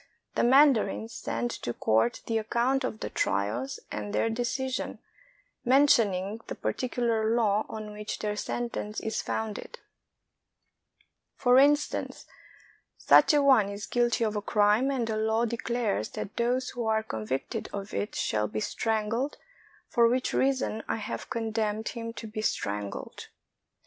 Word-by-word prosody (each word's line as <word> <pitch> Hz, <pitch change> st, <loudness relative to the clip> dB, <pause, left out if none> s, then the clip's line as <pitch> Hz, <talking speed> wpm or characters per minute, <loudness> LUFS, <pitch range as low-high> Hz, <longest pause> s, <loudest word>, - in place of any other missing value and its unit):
The -, -, +1 dB
mandarins 245 Hz, -4 st, +4 dB
send 240 Hz, +1 st, -3 dB
to 120 Hz, -, -3 dB
court 110 Hz, +2 st, +1 dB
the 225 Hz, -1 st, 0 dB
account 245 Hz, +5 st, +1 dB
of 220 Hz, -4 st, -4 dB
the -, -, -4 dB
trials 105 Hz, +7 st, -1 dB
and 105 Hz, -1 st, -4 dB
their 225 Hz, -, +1 dB
decision, 255 Hz, +3 st, -2 dB, 0.7 s
men 270 Hz, +4 st, +5 dB
tioning 205 Hz, -5 st, +2 dB
the -, -, -5 dB
particular 230 Hz, -3 st, 0 dB
law 215 Hz, -2 st, +2 dB
on 215 Hz, -1 st, -6 dB
which 210 Hz, 0 st, -5 dB
their 210 Hz, -1 st, -2 dB
sentence 215 Hz, -1 st, -3 dB
is 220 Hz, -, -2 dB
founded; 220 Hz, -2 st, -4 dB, 1.6 s
for 250 Hz, 0 st, +5 dB
instance, 290 Hz, +2 st, +2 dB, 0.4 s
" -, -, -27 dB, 0.2 s
Such -, -, +6 dB
a 290 Hz, -, +4 dB
one 255 Hz, -8 st, +5 dB
is 200 Hz, 0 st, -6 dB
guilty 240 Hz, -1 st, +1 dB
of 215 Hz, -1 st, -2 dB
a 210 Hz, -, -1 dB
crime, 210 Hz, +5 st, +3 dB
and 260 Hz, -4 st, 0 dB
the 220 Hz, -1 st, -2 dB
law 220 Hz, +2 st, +1 dB
declares 235 Hz, -, -1 dB
that 200 Hz, -, -5 dB
those 245 Hz, +2 st, 0 dB
who 240 Hz, -3 st, -3 dB
are 220 Hz, 0 st, +2 dB
convicted 110 Hz, -, -4 dB
of 200 Hz, 0 st, -6 dB
it 210 Hz, -, -3 dB
shall 105 Hz, 0 st, 0 dB
be 110 Hz, +1 st, -3 dB
strangled, 225 Hz, -, -1 dB, 0.5 s
for 235 Hz, -1 st, +4 dB
which 255 Hz, +1 st, 0 dB
reason 260 Hz, -5 st, +1 dB
I -, -, 0 dB
have 220 Hz, -2 st, -5 dB
condemned 220 Hz, -1 st, -1 dB
him 230 Hz, -1 st, -5 dB
to 230 Hz, -, -8 dB
be 215 Hz, 0 st, -5 dB
strangled." 105 Hz, -, -3 dB
220 Hz, 150 wpm, -28 LUFS, 210-240 Hz, 1.6 s, Such